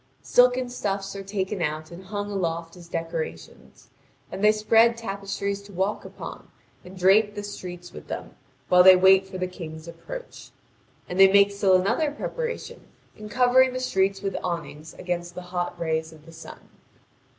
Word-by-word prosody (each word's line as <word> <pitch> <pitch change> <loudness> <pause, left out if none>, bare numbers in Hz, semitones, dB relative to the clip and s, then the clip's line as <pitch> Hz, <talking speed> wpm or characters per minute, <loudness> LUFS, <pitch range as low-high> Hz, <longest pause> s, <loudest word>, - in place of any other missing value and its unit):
Silken 250 0 +4
stuffs 200 -5 -3
are 195 - -5
taken 195 -1 -3
out 155 0 -3
and 180 +2 -11
hung 205 +1 -4
aloft 170 -3 -3
as 175 -1 -13
decorations, 160 - -6 0.4
and 195 - -5
they 210 - +7
spread 225 +2 +3
tapestries 200 -2 -4
to 200 0 -14
walk 195 +3 -2
upon - - -9 0.3
and 185 +1 -12
drape 205 +3 +4
the 205 - -5
streets 180 -3 -8
with - - -11
them, - - -6 0.3
while 180 0 +6
they 185 +1 +9
wait 190 +1 +5
for 190 -1 -7
the 185 - -1
King's 165 -3 -9
approach. - - -9 0.6
And 180 - -4
they 195 0 +8
make 200 0 +5
still 200 -2 +3
another 230 - +1
preparation, 475 +11 -5 0.3
in 215 0 -10
covering 255 +2 +4
the 255 - -3
streets 195 -5 0
with 195 - -2
awnings 160 -3 -5
against 175 -1 -4
the 180 - -6
hot 175 -1 -3
rays 160 -1 -2
of 155 -1 -17
the 165 - -13
sun. 165 - -12
190 Hz, 170 wpm, -25 LUFS, 175-210 Hz, 0.6 s, they